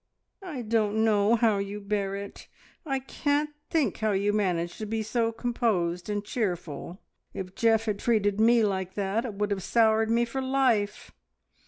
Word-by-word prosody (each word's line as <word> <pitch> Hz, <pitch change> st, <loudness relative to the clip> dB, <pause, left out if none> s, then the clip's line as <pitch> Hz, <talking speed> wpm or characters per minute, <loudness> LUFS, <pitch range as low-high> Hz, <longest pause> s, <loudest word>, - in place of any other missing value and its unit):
"I 310 Hz, -10 st, -6 dB
don't 220 Hz, -1 st, +1 dB
know 210 Hz, +1 st, +4 dB
how 220 Hz, -3 st, +2 dB
you 200 Hz, +1 st, -4 dB
bear 200 Hz, -1 st, -2 dB
it! 200 Hz, 0 st, -8 dB, 0.4 s
I 270 Hz, -2 st, 0 dB
can't 290 Hz, +3 st, -1 dB, 0.2 s
think 315 Hz, -4 st, +1 dB
how 215 Hz, -1 st, 0 dB
you 200 Hz, +2 st, +1 dB
manage 175 Hz, -5 st, -1 dB
to 215 Hz, -, -4 dB
be 220 Hz, +1 st, -2 dB
so 225 Hz, +1 st, 0 dB
composed 215 Hz, -7 st, -1 dB
and 205 Hz, 0 st, -2 dB
cheerful! 180 Hz, -, -3 dB, 0.4 s
If 185 Hz, -1 st, -6 dB
Geoff 225 Hz, 0 st, +2 dB
had 210 Hz, -2 st, -1 dB
treated 210 Hz, -3 st, +1 dB
me 230 Hz, 0 st, +5 dB
like 190 Hz, -3 st, -1 dB
that, 205 Hz, +4 st, -1 dB
it 220 Hz, -5 st, -5 dB
would 210 Hz, +1 st, -1 dB
have 195 Hz, -1 st, -1 dB
soured 220 Hz, +2 st, +3 dB
me 235 Hz, +1 st, +3 dB
for 265 Hz, +3 st, -4 dB
life. 255 Hz, -6 st, +1 dB
215 Hz, 170 wpm, -27 LUFS, 200-230 Hz, 0.4 s, me